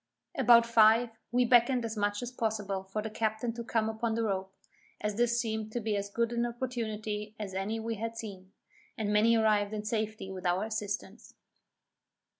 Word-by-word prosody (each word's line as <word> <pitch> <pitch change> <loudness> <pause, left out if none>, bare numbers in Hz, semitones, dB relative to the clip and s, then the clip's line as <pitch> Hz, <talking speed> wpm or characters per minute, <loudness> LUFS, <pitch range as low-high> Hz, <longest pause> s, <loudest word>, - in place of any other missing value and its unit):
About 235 -1 +6
five, 230 +1 +5 0.2
we 245 +1 +3
beckoned 240 0 +4
as 225 0 -4
much 205 +2 -1
as 245 - -5
possible 210 -5 -2
for 195 +2 -4
the 220 - -3
captain 220 +2 -1
to 235 0 -6
come 225 -1 0
upon 220 +1 -1
the 230 - 0
rope, 190 -3 -2 0.5
as 210 0 -1
this 240 +2 +2
seemed 220 -2 -2
to 240 - -1
be 220 -2 -1
as 200 0 -2
good 235 +3 0
an 235 0 0
opportunity 220 -4 -3
as 205 -3 -5
any 200 +4 -2
we 225 0 -3
had 230 +2 -4
seen; 195 -4 -8 0.5
and 210 -2 -1
many 225 +2 +5
arrived 215 -1 +2
in 210 0 -4
safety 215 -3 -2
with 185 -1 -7
our 180 +3 +1
assistance. 210 -1 -5
220 Hz, 185 wpm, -30 LUFS, 210-230 Hz, 0.5 s, About